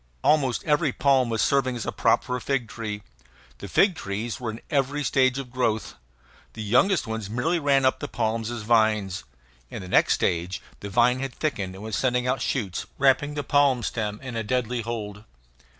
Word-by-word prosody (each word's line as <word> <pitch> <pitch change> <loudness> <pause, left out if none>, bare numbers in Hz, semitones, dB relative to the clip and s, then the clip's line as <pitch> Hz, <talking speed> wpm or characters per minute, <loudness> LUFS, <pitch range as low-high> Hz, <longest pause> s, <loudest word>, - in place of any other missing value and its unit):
Almost 135 -6 +2
every 150 -1 +2
palm 135 -2 +2
was 115 -1 +1
serving 130 -2 +2
as 120 - -4
a - - -2
prop - - +2
for 125 - -3
a 125 - -4
fig 135 -4 -1
tree. 105 -2 -5 0.6
The - - -7
fig 190 - +4
trees 110 -4 -4
were 120 -2 -3
in 110 +1 -6
every 145 0 0
stage 130 -1 +2
of 135 -3 -6
growth. 115 -4 -1 0.6
The 110 - -6
youngest 140 - +3
ones 110 -3 -4
merely 130 +10 0
ran 140 -3 +3
up 130 - +2
the - - -4
palms 115 -1 -1
as 120 -3 -5
vines. 105 - +2 0.4
In - - -7
the - - -8
next - - +4
stage 90 +2 -1 0.2
the 100 - -6
vine 120 +5 +3
had 135 -2 -4
thickened 100 -12 -2
and 95 - -10
was 110 -1 -3
sending 125 -1 +1
out 125 0 0
shoots, 105 -11 -2
wrapping 140 +2 +3
the 145 - -2
palm 140 -3 +3
stem 105 -2 -3
in 130 -3 -6
a 115 - -1
deadly 125 +1 -1
hold. 105 -3 -5
120 Hz, 200 wpm, -25 LUFS, 110-135 Hz, 0.6 s, fig